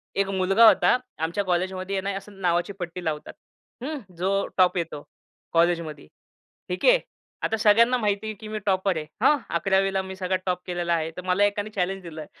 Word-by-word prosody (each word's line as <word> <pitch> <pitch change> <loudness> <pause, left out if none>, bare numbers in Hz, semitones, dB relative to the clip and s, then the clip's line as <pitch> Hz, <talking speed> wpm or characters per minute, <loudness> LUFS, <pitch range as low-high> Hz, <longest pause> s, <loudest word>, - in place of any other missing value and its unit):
1 200 0 +1
मुलगा 195 +3 +4
होता 235 - +5 0.2
आमच्या 165 +5 -1
कॉलेजमध्ये 185 +2 -1
आहे 190 - 0
ना, - - -4
असं 195 0 -11
नावाची 175 +2 +1
पट्टी 175 0 -5
लावतात. 150 -1 -3 0.5
हं. 300 +2 -3 0.2
जो 195 +3 +1
टॉप 185 0 +4
येतो, 160 -4 -3 0.5
कॉलेजमध्ये. 165 - +1 0.6
ठीक 180 - -2
आहे. - - +7 0.4
आता 220 - 0
सगळ्यांना 230 +4 +5
माहिती 210 -2 -1
आहे, 215 - -3
कि 215 +2 -10
मी 215 0 -4
टॉपर 190 -2 +1
आहे. 155 - -4 0.2
हां. 300 - +6 0.2
11वीला 195 +2 +2
मी 190 0 -7
सगळा 185 0 -1
टॉप 180 -1 -1
केलेला 175 -1 -1
आहे. 165 -1 -1
तर - - -4
मला 185 +2 +2
एकाने 205 +1 -1
चॅलेंज 195 -2 -2
दिलं, 160 -3 -8
190 Hz, 185 wpm, -25 LUFS, 175-200 Hz, 0.6 s, आहे